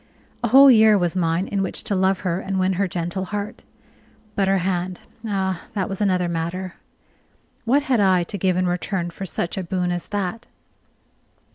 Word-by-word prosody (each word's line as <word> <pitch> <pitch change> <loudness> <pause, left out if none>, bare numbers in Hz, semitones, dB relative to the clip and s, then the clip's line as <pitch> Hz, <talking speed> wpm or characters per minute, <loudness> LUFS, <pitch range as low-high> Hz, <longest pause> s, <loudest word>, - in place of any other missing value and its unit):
A - - +2
whole 270 +4 +8
year 220 -2 +6
was 175 -2 0
mine 170 +1 0
in 200 - -1
which 190 - -2
to - - -2
love 190 0 +1
her 180 -1 -1
and 195 0 -3
win 185 +1 +2
her 195 +2 0
gentle 175 +2 -3
heart. 205 +1 -5 0.7
But 195 -2 +1
her 195 0 +3
hand 180 -1 -2 0.3
ah, 190 -3 -2
that 190 -3 0
was 195 +1 -5
another 185 -3 +2
matter. 170 +2 -3 0.9
What 275 +5 +3
had 260 -5 +1
I 190 -3 +4
to 200 - -5
give 185 0 +1
in 185 - +1
return 175 0 -2
for 190 +3 -7
such 175 +2 -3
a - - -3
boon 180 0 -1
as 175 -1 -4
that? 205 +3 -3
190 Hz, 185 wpm, -22 LUFS, 175-200 Hz, 0.9 s, whole